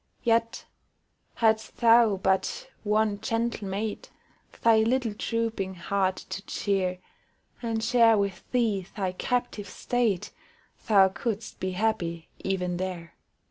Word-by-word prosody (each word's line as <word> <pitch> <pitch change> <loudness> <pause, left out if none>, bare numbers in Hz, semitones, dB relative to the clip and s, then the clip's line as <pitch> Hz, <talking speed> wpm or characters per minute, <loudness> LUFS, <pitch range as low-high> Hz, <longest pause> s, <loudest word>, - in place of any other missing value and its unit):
Yet, 230 0 +1 0.7
hadst 220 -1 +1
thou 230 -3 +5
but 190 0 -1
one 210 -1 +1
gentle 225 -2 -1
mate 215 - -4 0.5
Thy 230 -1 +6
little 230 0 +1
drooping 225 -4 -2
heart 190 +1 0 0.2
to 195 +1 -4
cheer, 190 -3 0 0.6
And 225 -2 -2
share 230 -1 +5
with 200 -2 -1
thee 215 -7 +1
thy 190 -3 0
captive 215 0 -2
state, 230 -3 -1 0.6
Thou 195 -4 +6
couldst 220 +4 -4
be 185 0 -2
happy 180 -5 -1
even 180 -2 -2
there. 180 -2 -5
210 Hz, 115 wpm, -27 LUFS, 190-230 Hz, 0.7 s, Thy